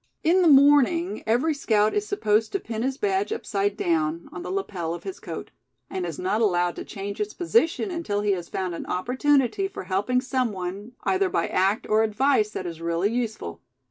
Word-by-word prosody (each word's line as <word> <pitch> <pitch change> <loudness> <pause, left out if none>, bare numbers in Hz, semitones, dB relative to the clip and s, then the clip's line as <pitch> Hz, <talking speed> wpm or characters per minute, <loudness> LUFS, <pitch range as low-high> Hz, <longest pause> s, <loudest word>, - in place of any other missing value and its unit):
In 355 +4 +4
the 350 - +4
morning 290 +5 +5
every 250 +8 +2
scout 215 -6 +2
is 415 0 -1
supposed 220 - +1
to 395 - +1
pin 225 -9 -5
his 265 +2 -1
badge 395 +2 0
upside 205 - -1
down, 165 -1 0
on - - -7
the - - -6
lapel 190 - -3
of - - -10
his 385 - -6
coat; - - -7 0.4
and 375 -1 -2
is - - -5
not 360 -11 0
allowed 175 -4 +2
to - - -4
change 200 0 -6
its 210 0 -3
position 370 +1 +1
until 225 -13 -2
he 205 -1 +1
has 175 -3 -3
found 185 -2 -3
an 170 - -6
opportunity 265 - +1
for 385 - -8
helping 200 +7 0
some 255 -2 -1
one, 195 +4 -6
either 380 0 +2
by - - 0
act, 195 +3 +1
or 215 +1 +3
advice 220 +1 +2
that 190 - -5
is 165 -2 -6
really 170 +5 0
useful. 225 - -3
225 Hz, 200 wpm, -25 LUFS, -, 0.4 s, morning